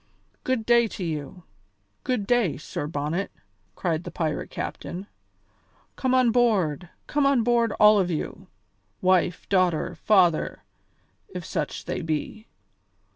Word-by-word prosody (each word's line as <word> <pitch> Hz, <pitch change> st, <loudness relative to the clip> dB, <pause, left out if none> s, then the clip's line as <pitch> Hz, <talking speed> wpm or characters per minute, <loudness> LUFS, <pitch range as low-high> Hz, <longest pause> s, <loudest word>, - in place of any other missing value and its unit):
"Good 255 Hz, -4 st, -1 dB
day 235 Hz, 0 st, +5 dB
to 190 Hz, -, -4 dB
you! 160 Hz, +1 st, -5 dB, 0.6 s
Good 250 Hz, -6 st, -1 dB
day, 235 Hz, -7 st, +2 dB
Sir 145 Hz, -, -5 dB
Bonnet," 155 Hz, +5 st, -2 dB, 0.5 s
cried 165 Hz, -2 st, -1 dB
the -, -, -6 dB
pirate 155 Hz, -3 st, -2 dB
captain; 185 Hz, +3 st, -5 dB, 0.9 s
"come 260 Hz, -1 st, +1 dB
on 255 Hz, -2 st, +4 dB
board, 190 Hz, -, +1 dB, 0.2 s
come 290 Hz, -1 st, +1 dB
on 270 Hz, -4 st, +3 dB
board, 235 Hz, -1 st, +2 dB
all 210 Hz, 0 st, +6 dB
of 185 Hz, -2 st, +1 dB
you, 160 Hz, -3 st, -4 dB, 0.5 s
wife, 180 Hz, -1 st, +2 dB
daughter, 185 Hz, -5 st, +1 dB
father, 180 Hz, -6 st, +2 dB, 0.7 s
if -, -, -7 dB
such -, -, -3 dB
they -, -, -3 dB
be! 160 Hz, +8 st, -4 dB
190 Hz, 130 wpm, -25 LUFS, 165-235 Hz, 0.9 s, all